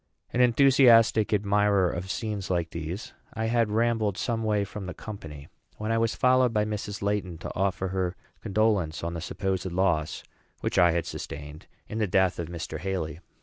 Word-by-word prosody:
An 125 - +2
enthusiastic 120 -3 +5
admirer 100 -2 +3
of 90 +3 -5
scenes 105 0 -3
like 85 -3 -1
these, 85 +6 -5 0.2
I 110 0 -1
had 115 -1 +2
rambled 110 -2 +1
some 115 -2 -1
way 105 -2 +1
from 100 -1 -7
the 90 - -6
company, 80 -9 -9 0.3
when 110 +1 -3
I 115 - +2
was 115 0 +1
followed 130 -1 +4
by 105 -1 +1
Mrs. 105 -1 -4
Laiton 100 -4 -1
to - - -5
offer 95 0 0
her 90 -1 -1 0.3
condolence 100 -7 +1
on 85 0 -2
the 85 - -4
supposed 95 +1 -2
loss 85 -4 0 0.4
which - - 0
I 90 -1 +6
had 85 -1 0
sustained 75 +1 -7 0.2
in 110 - -4
the 105 - +1
death 95 -1 +2
of 85 - -3
Mr. 85 -2 -5
Haly. 85 -4 -3
100 Hz, 180 wpm, -27 LUFS, 85-110 Hz, 0.4 s, I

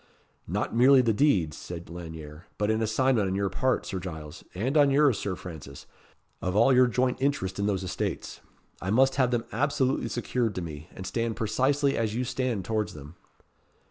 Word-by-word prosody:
"Not - - -2
merely 130 +2 +6
the 115 -2 +2
deeds," 100 - +2
said 85 -1 -8
Lanyere; 80 0 -9
"but 105 +1 +1
an 110 0 0
assignment 110 -1 +2
on 95 - -1
your 100 -1 0
part, 130 +6 0
Sir 95 - -4
Giles, 80 -3 -8
and 125 - -1
on 145 -2 +6
yours, 140 -5 +4
Sir 95 -2 -2
Francis, 75 -7 -10 0.6
of 90 0 -2
all 115 +5 +5
your 125 0 +6
joint 125 +1 0
interest 105 -10 -1
in 100 - +1
those 95 -2 -1
estates. 90 - -4 0.4
I 90 - -3
must 135 +6 +3
have 130 -3 +3
them 120 -2 -1
absolutely 135 +1 0
secured 120 -3 -1
to 90 - -3
me; 80 0 -8
and 95 - -7
stand 115 +4 -2
precisely 135 +6 +1
as 110 -1 -1
you 125 - 0
stand 125 -6 -2
towards 110 -5 -2
them." 75 +1 -10
110 Hz, 185 wpm, -27 LUFS, 90-130 Hz, 0.6 s, merely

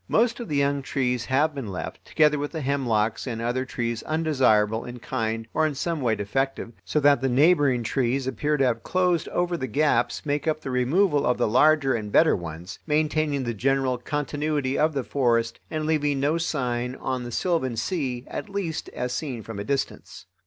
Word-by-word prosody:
Most 235 +1 +2
of 235 - -5
the 150 - -1
young 140 0 +1
trees 125 -3 -1
have 145 +4 +2
been 135 -5 -5
left, 95 -2 -6
together 150 -1 +3
with 145 +3 -4
the 160 - -3
hemlocks 120 -5 0
and 115 -3 -3
other 120 +3 -1
trees 120 -3 -3
undesirable 130 -9 +2
in 120 0 -8
kind 115 -2 -3
or 155 - +2
in 150 - -4
some 165 +2 -2
way 115 -3 +2
defective, 115 +4 -2
so 150 - 0
that 145 -2 +5
the 135 - +1
neighboring 140 -2 +4
trees 130 +3 0
appear 145 +4 0
to 135 - +3
have 115 -2 0
closed 180 0 +1
over 175 0 0
the 130 -6 -3
gaps 145 +7 +1
make 145 +2 -1
by 155 - +3
the 135 - -6
removal 145 +5 +2
of 125 -2 +1
the 120 - +1
larger 135 +3 +4
and 105 -3 -3
better 160 +7 +5
ones, 85 0 -7
maintaining 150 -2 +1
the 120 -1 -2
general 130 +2 0
continuity 145 0 -2
of 155 +1 +2
the 135 -2 -1
forest 115 -3 0
and 155 -1 -3
leaving 150 -3 +1
no 150 +4 +1
sign 125 -6 -2
on 130 -2 -3
the 120 - -6
sylvan 130 -4 0
sea, 125 -3 -2
at - - -6
least 195 -6 -3
as 125 0 -2
seen 125 -6 -4
from 110 -2 -7
a - - -3
distance. 135 +5 -4
135 Hz, 195 wpm, -25 LUFS, 120-150 Hz, -, that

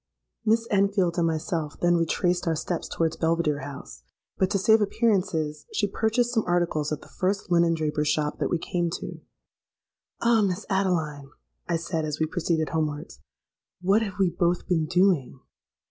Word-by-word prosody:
"Miss 225 +1 +2
Enfield 195 -3 +2
and 165 - +3
myself 160 -1 -2
then 175 0 +3
retraced 175 +2 0
our 165 - +2
steps 170 +2 -3
towards 165 -1 -1
Belvidere 160 -3 +1
House; 135 - -9 0.3
but 190 - +1
to 200 - +1
save 220 +3 +4
appearances, 185 -9 0
she 205 - +1
purchased 225 +4 0
some 225 -3 +2
articles 170 -4 0
at 150 - -3
the - - -14
first 190 0 -2
linen 170 -1 +4
draper's 150 -1 -1
shop 150 0 0
that - - 0
we 175 - +1
came 170 +1 -1
to. - - -8 1.0
'Ah! 235 -1 +4
Miss 195 0 -1
Adeline,' 160 -8 0 0.4
I - - +2
said, 165 0 -2
as 155 -1 -3
we 160 - +2
proceeded 160 -1 -1
homewards, 155 0 -3 0.6
'what 195 +4 +3
have 200 -4 -4
we 190 -3 +2
both 175 0 0
been 160 -4 +1
doing?' 175 -8 +2
175 Hz, 165 wpm, -26 LUFS, 155-195 Hz, 1.0 s, save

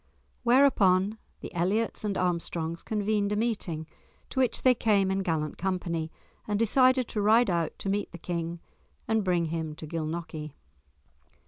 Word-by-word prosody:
Whereupon 220 -6 +4 0.2
the - - -8
Elliots 195 +8 0
and 205 -2 -1
Armstrongs 170 -2 -2
convened 210 -1 0
a - - 0
meeting, 205 -8 -2 0.5
to 265 - -2
which 255 -2 +1
they 255 - +6
came 205 -5 +2
in 190 - 0
gallant 160 -5 -2
company, 170 -3 -2 0.4
and 210 -1 0
decided 255 +3 +4
to 210 - -2
ride 220 +1 +4
out 170 -2 -1
to - - -6
meet 200 +1 -1
the - - -8
King 170 0 -4 0.5
and 220 -1 +1
bring 175 -3 +1
him 160 -2 -3
to 155 - -8
Gilnockie. 155 -1 -5
190 Hz, 150 wpm, -28 LUFS, 165-220 Hz, 0.5 s, they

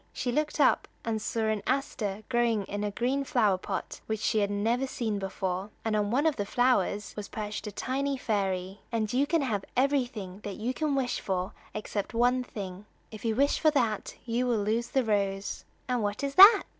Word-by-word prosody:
She 250 - -2
looked 300 +4 -1
up 280 - +4 0.2
and 220 -1 -1
saw 225 - -2
an 220 -1 +1
aster 215 -7 -1
growing 235 -4 +2
in 205 +2 -4
a 210 - 0
green 250 +7 0
flower 215 -8 +2
pot 190 0 -5
which 220 -1 -1
she 215 0 +1
had 200 -1 +1
never 230 +6 0
seen 220 -5 -2
before; 190 0 -3 0.2
and 220 -1 +1
on 205 -1 +1
one 270 +7 +2
of 315 -3 +2
the 205 - 0
flowers 215 -4 +1
was 210 -1 -5
perched 210 0 -5
a - - -4
tiny 275 +6 -1
fairy. 195 -4 -1
"And 220 -2 -1
you 275 +3 +2
can 325 -1 +2
have 210 -7 -1
everything 245 -8 0
you 215 +5 -3
can 300 0 0
wish 260 -2 0
for 185 -1 -2 0.2
except 210 +1 -3
one 250 +2 +3
thing. 200 -3 -7 0.2
If 215 -2 -9
you 225 -2 0
wish 280 +4 +3
for 315 - +5
that 230 -8 0
you 245 +1 0
will 225 -4 +1
lose 225 +3 0
the 265 - +1
rose." 200 -3 -1 0.2
"And 250 -2 0
what 205 +4 -2
is 280 0 -1
that?" 395 +8 +10
220 Hz, 200 wpm, -29 LUFS, 205-255 Hz, 0.2 s, that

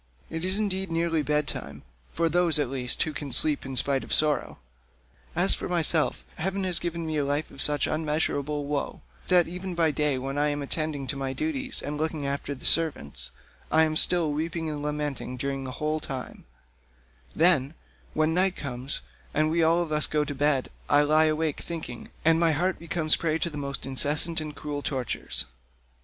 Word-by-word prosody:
It 165 +1 -4
is 185 +2 +2
indeed 190 -3 0
nearly 165 -1 +1
bed 150 0 0
time—for 65 - -3
those, 170 -1 +3
at 145 -4 0
least, 125 -2 0
who 155 - -4
can 145 -2 -5
sleep 145 +2 +3
in 135 - -5
spite 135 +2 +1
of - - -10
sorrow. 150 -1 +2 0.8
As - - +4
for - - -3
myself, 165 -3 +2
heaven 190 +4 -1
has 180 -2 -1
given 170 -1 -3
me 155 -1 -2
a 145 - +1
life 145 +2 -1
of 135 - -6
such 145 -1 +2
unmeasurable 150 -2 -1
woe, 145 -1 -3 0.2
that 180 -2 +4
even 180 +1 -5
by 165 -2 +3
day 145 -1 +1
when 135 +2 -3
I 150 - +3
am 145 -1 -2
attending 150 -1 -1
to 140 - -1
my 135 -1 -3
duties 275 - -2
and 150 +1 -4
looking 155 -2 -1
after 140 +1 -3
the - - -9
servants, 70 - +3 0.4
I 160 +1 +5
am 155 -1 0
still 165 -1 +4
weeping 160 +1 -2
and 150 -1 -5
lamenting 150 -3 -3
during 135 +1 -3
the 130 - -5
whole 155 +1 -1
time; 135 -4 -7 0.9
then, 155 -3 +3 0.4
when 155 +1 +2
night 185 +1 +2
comes, 130 0 -5 0.3
and 155 +1 +2
we 170 +1 +2
all 165 +2 +4
of 160 - -7
us 150 0 +2
go 150 -1 0
to 145 - -4
bed, 140 -1 +1 0.2
I 145 +1 +5
lie 155 +2 +5
awake 155 -1 0
thinking, 155 -8 -6 0.2
and 165 0 +5
my 165 -1 +4
heart 180 +5 0
becomes 170 -2 +1
a - - +5
prey 160 -1 0
to 170 +1 -2
the - - -9
most 140 -1 -4
incessant 145 +5 +3
and 150 -1 -6
cruel 145 -1 -4
tortures. 130 -4 -2
150 Hz, 195 wpm, -27 LUFS, 140-165 Hz, 0.9 s, I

